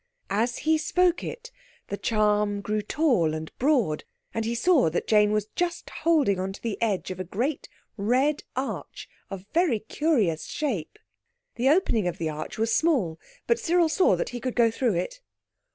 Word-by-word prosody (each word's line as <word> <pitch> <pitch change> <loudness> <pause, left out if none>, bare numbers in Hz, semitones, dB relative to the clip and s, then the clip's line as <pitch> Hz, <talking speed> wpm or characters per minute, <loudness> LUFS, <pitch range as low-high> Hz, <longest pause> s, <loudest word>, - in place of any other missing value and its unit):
As 230 +4 +1
he 315 0 +3
spoke 355 +2 +2
it 480 0 -7 0.4
the - - -2
charm 210 -1 +1
grew 210 +1 -1
tall 210 - +1
and 155 0 -7
broad, 245 - +2 0.3
and 225 0 -2
he 235 +1 -1
saw 280 - +4
that 160 - -2
Jane 210 -1 +4
was 210 -1 +1
just 350 0 -2
holding 290 - +2
on 190 +1 -3
to - - -12
the 225 -3 -3
edge 205 -5 0
of 185 - -6
a - - -2
great 245 - -3 0.3
red 255 +8 +1
arch 260 +2 -4 0.2
of 195 -1 -7
very 335 -8 +3
curious 215 - 0
shape. 225 - -3 0.6
The 250 +3 +1
opening 275 - +2
of 175 - -3
the 160 -1 -2
arch 155 0 -6
was 225 +1 +1
small, 230 - +1 0.3
but 470 - +2
Cyril 345 -1 +2
saw 370 +4 +3
that - - -2
he 245 - -5
could 255 0 -3
go 235 -2 +4
through 230 -3 0
it. - - -3
230 Hz, 180 wpm, -26 LUFS, 200-310 Hz, 0.6 s, saw